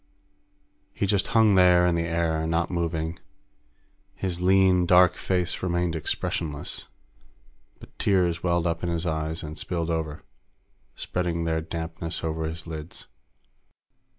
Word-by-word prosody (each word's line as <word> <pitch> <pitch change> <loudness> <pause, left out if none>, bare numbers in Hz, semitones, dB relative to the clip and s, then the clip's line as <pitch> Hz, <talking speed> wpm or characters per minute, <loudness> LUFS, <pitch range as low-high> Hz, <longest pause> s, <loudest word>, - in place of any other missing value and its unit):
He - - -1
just 100 -1 +1
hung 110 -3 +4
there 90 -1 +6
in 90 - +3
the 85 0 0
air, 80 -1 0
not 85 +2 0
moving. 85 -1 -2 1.0
His 90 -2 -3
lean, 95 -1 +4
dark 90 0 +6
face 90 -1 -1
remained 85 -2 0
expressionless, 75 -1 -2 0.9
but - - -16
tears 90 -4 +2
welled 85 -1 +1
up 85 -1 -1
in 85 - -2
his 85 0 -1
eyes 80 0 -2
and 75 +1 -7
spilled 85 -2 -2
over, 80 -2 -3 0.7
spreading 85 -2 -2
their 80 -1 0
dampness 80 0 -5
over 80 0 -2
his 80 +1 -5
lids. 80 0 -7
85 Hz, 130 wpm, -26 LUFS, 80-90 Hz, 1.0 s, there